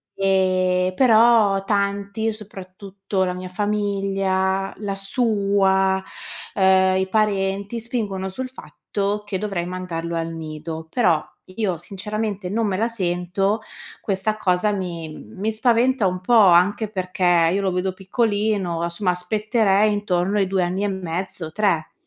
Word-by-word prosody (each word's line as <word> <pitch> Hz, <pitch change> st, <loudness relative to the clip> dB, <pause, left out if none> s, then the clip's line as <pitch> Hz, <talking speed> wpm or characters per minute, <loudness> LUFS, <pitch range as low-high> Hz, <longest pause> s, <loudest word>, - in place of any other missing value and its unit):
Ehm, 185 Hz, -1 st, +2 dB
però 225 Hz, -4 st, +5 dB
tanti, 200 Hz, +2 st, -1 dB
soprattutto 195 Hz, -2 st, -5 dB
la 180 Hz, -, -2 dB
mia 185 Hz, 0 st, -7 dB
famiglia, 195 Hz, -1 st, 0 dB
la 200 Hz, -1 st, -3 dB
sua, 195 Hz, -3 st, +1 dB, 0.5 s
ehm, 190 Hz, -1 st, +4 dB
i 190 Hz, -, -1 dB
parenti 200 Hz, +1 st, 0 dB
spingono 210 Hz, -5 st, -3 dB
sul 255 Hz, +7 st, -5 dB
fatto 210 Hz, -4 st, -4 dB
che 205 Hz, -2 st, -3 dB
dovrei 195 Hz, -3 st, -3 dB
mandarlo 175 Hz, -2 st, -4 dB
al 165 Hz, 0 st, -2 dB
nido; 160 Hz, 0 st, -6 dB
però, 175 Hz, -7 st, +2 dB, 0.3 s
io 195 Hz, -5 st, -1 dB
sinceramente, 205 Hz, +2 st, -4 dB
non 225 Hz, +3 st, 0 dB
me 190 Hz, -2 st, -1 dB
la 225 Hz, +3 st, +1 dB
sento, 195 Hz, 0 st, -1 dB, 0.4 s
questa 205 Hz, +2 st, -1 dB
cosa 190 Hz, +1 st, +1 dB
mi 175 Hz, -5 st, -4 dB
mi 195 Hz, -, -4 dB
spaventa 235 Hz, 0 st, +2 dB
un 180 Hz, 0 st, -3 dB
po', 215 Hz, +6 st, 0 dB
anche 185 Hz, +5 st, +4 dB
perché 180 Hz, -4 st, +2 dB
io 195 Hz, +2 st, 0 dB
lo 195 Hz, -1 st, 0 dB
vedo 180 Hz, +1 st, 0 dB
piccolino, 205 Hz, -3 st, -1 dB
a 170 Hz, -, -1 dB
somma 180 Hz, +2 st, 0 dB
aspetterei 210 Hz, +3 st, +1 dB
intorno 200 Hz, -1 st, 0 dB
ai 195 Hz, -2 st, +2 dB
2 190 Hz, -1 st, +1 dB
anni 185 Hz, +3 st, -1 dB
e -, -, +1 dB
mezzo, 180 Hz, -3 st, -4 dB
3. 175 Hz, -4 st, 0 dB
195 Hz, 135 wpm, -22 LUFS, 185-210 Hz, 0.5 s, però